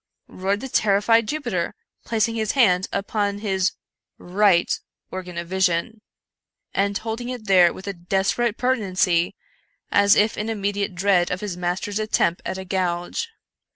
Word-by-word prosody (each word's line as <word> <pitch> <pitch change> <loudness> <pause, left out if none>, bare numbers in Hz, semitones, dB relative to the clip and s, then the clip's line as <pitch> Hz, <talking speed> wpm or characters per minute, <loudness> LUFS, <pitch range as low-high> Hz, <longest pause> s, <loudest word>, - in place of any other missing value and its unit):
roared 195 +3 -2
the 265 - -5
terrified 215 0 +3
Jupiter, 300 +3 -2 0.3
placing 225 0 +1
his 220 -2 -1
hand 190 -9 +3
upon 200 0 -1
his 195 -2 0 0.4
right 185 -1 +3 0.5
organ 180 -2 -6
of 170 0 -4
vision, 190 +3 0 0.7
and 200 +1 +1
holding 230 +2 -4
it 245 -4 -6
there 180 -4 +6
with 190 - -10
a 200 - -3
desperate 195 +6 0
pertinacity, 190 -8 +1 0.6
as 200 0 +5
if 210 +1 +2
in 215 +1 -2
immediate 200 -2 -2
dread 180 -1 +2
of 180 - -3
his 205 -4 -4
mas 180 +1 -2
ter's 205 +1 -3
attempt 215 -5 +1
at 190 - -3
a 190 - -6
gouge. 180 - -2
200 Hz, 150 wpm, -23 LUFS, 180-215 Hz, 0.7 s, there